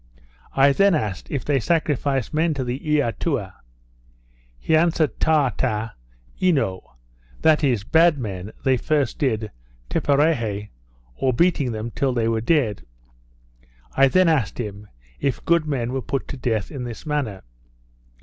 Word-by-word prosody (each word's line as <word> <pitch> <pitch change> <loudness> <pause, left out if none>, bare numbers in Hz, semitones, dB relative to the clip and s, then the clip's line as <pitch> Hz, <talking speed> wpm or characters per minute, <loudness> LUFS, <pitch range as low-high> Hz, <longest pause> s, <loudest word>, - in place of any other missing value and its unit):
I 135 +1 +5
then 195 +2 +4
asked, 105 -10 -3
If 140 - -3
they 145 -2 +2
sacrificed 140 -3 0
men 160 0 +1
to 135 - -2
the 125 +1 -3
Eatua? 140 - -1 1.0
He 160 - +1
answered 160 -5 +2
Taata 130 -7 +1 0.5
eno; 135 - 0 0.5
that 155 0 +4
is, 120 -8 +1
bad 165 +5 +4
men 100 -5 -5
they 130 -1 +3
did, - - -11
first 150 -3 0
Tipperahy, 110 - -1 0.4
or 130 - 0
beating 145 -2 +2
them 110 +1 -5
till 135 +3 0
they 115 -2 0
were 115 -1 0
dead. 120 -6 +1 1.1
I 135 0 +6
then 185 +6 +4
asked 140 - +1
him, 105 -2 -6 0.3
If 135 -3 -2
good 170 -2 +2
men 125 -4 -2
were 135 - -1
put 135 +3 -3
to - - -5
death 115 -5 -2
in 135 -4 -5
this 120 -3 -7
manner? 140 -11 -2
130 Hz, 140 wpm, -22 LUFS, 110-150 Hz, 1.1 s, I